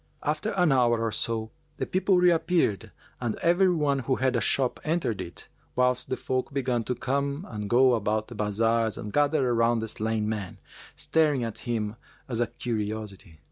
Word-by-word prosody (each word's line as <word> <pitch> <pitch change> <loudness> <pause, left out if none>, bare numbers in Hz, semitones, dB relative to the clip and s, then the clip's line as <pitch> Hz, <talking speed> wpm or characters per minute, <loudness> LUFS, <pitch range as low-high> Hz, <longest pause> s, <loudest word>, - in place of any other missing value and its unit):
After 155 +8 -1
an 180 -5 +3
hour 120 -3 +3
or 115 - 0
so, 110 0 -2 0.3
the - - -2
people 185 0 +2
reappeared 175 - +2 0.3
and 120 -3 -2
every 175 +3 +3
one 150 -5 +1
who 130 +1 0
had 130 0 +1
a - - +1
shop 130 -3 +1
entered 155 - -1
it; 85 -1 -9 0.3
whilst 125 0 +1
the 130 - -1
folk 130 0 -2
began 125 -4 0
to 125 - -1
come 140 - -2
and 105 -2 -5
go 125 +2 +5
about 110 -1 0
the 120 - -9
bazars 110 +1 +1
and 105 - -6
gathered 145 -1 +3
around 120 -1 +2
the 110 0 -2
slain 110 0 -1
man, 105 -4 -4 0.4
staring 150 -5 +1
at 115 -2 -5
him 110 -1 -2 0.3
as 120 -3 -2
a 120 - +2
curiosity. 105 -6 -5
120 Hz, 180 wpm, -27 LUFS, 110-140 Hz, 0.4 s, go